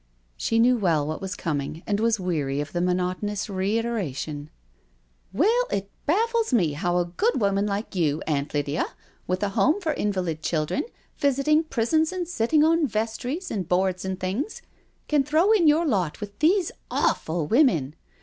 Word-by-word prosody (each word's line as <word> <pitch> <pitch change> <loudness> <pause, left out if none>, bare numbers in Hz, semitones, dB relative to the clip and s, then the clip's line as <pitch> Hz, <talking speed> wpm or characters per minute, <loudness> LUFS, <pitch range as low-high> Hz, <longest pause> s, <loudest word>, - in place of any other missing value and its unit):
She 225 - 0
knew 245 +2 +5
well 165 -7 +2
what 155 +1 -4
was 195 +1 -4
coming, 155 -1 -3
and 205 -1 0
was 225 -1 +2
weary 150 -7 -1
of 145 0 -4
the 175 - -1
monoto 180 +1 0
nous 205 -1 -2
reiteration, 190 - -2 0.4
*' - - -40
Well, 470 +7 +4
it 200 0 -3 0.2
baffles 455 +6 +1
me 175 - +2
how 175 +3 0
a 175 - +2
good 405 - 0
woman 200 -1 +1
like 205 +2 -3
you, 160 -5 0
Aunt 145 -2 -1
Lydia, 145 +1 -1 0.4
with 185 +2 -1
a 205 - +1
home 305 - +2
for 325 -6 -1
invalid 185 - -2
children, 155 - -1 0.3
visiting 285 +3 +3
prisons 315 +5 +1
and 365 -2 -3
sitting 300 -1 +2
on 325 -1 +3
vestries 235 - -3
and 185 -5 -3
boards 185 0 +1
and 190 -1 -3
things, 200 - -3 0.4
can 295 -2 +3
throw 315 +8 +3
in 385 -7 +4
your 310 +3 +4
lot 185 - 0
with 205 -1 -8
these 345 +3 +3 0.2
awful 160 0 0
women. 170 - +3
200 Hz, 170 wpm, -25 LUFS, -, 0.4 s, knew